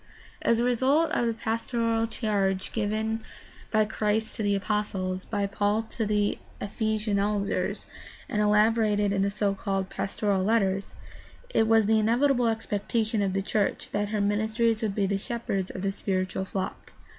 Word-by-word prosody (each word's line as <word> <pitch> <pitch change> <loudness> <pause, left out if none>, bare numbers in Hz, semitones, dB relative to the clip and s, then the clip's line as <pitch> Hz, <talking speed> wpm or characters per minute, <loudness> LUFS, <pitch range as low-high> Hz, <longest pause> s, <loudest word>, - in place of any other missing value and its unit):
As 230 - +3
a 235 - +1
result 260 +6 +3
of 240 - +1
the 230 - +1
pastoral 230 0 0
charge 200 -4 -1
given 220 +1 -1 0.5
by 215 -1 +3
Christ 215 0 -1
to - - -3
the 205 -1 +2
apostles, 195 -2 -2
by 205 -2 -1
Paul 205 +2 0
to 220 -2 -2
the 210 -1 +1 0.2
Ephesian 215 0 -1
elders, 200 0 -1 0.4
and 210 - 0
elaborated 210 -1 +3
in 195 - +1
the 200 - +2
so 205 0 0
called 195 -1 -2
Pastoral 195 -1 -1
Letters, 195 -2 +1 0.6
it 225 - +3
was 225 -1 +5
the 220 +1 +4
inevitable 245 +3 +3
expectation 220 0 -1
of 195 -2 0
the 195 0 0
church 205 0 -1
that 205 0 -1
her 210 -1 0
ministers 220 +3 +1
would 210 -3 -1
be 200 - +1
the 195 0 0
shepherds 195 -4 -3
of 185 - -6
the 195 - +1
spiritual 190 -1 -2
flock. 190 0 -5
210 Hz, 160 wpm, -27 LUFS, 200-225 Hz, 0.6 s, was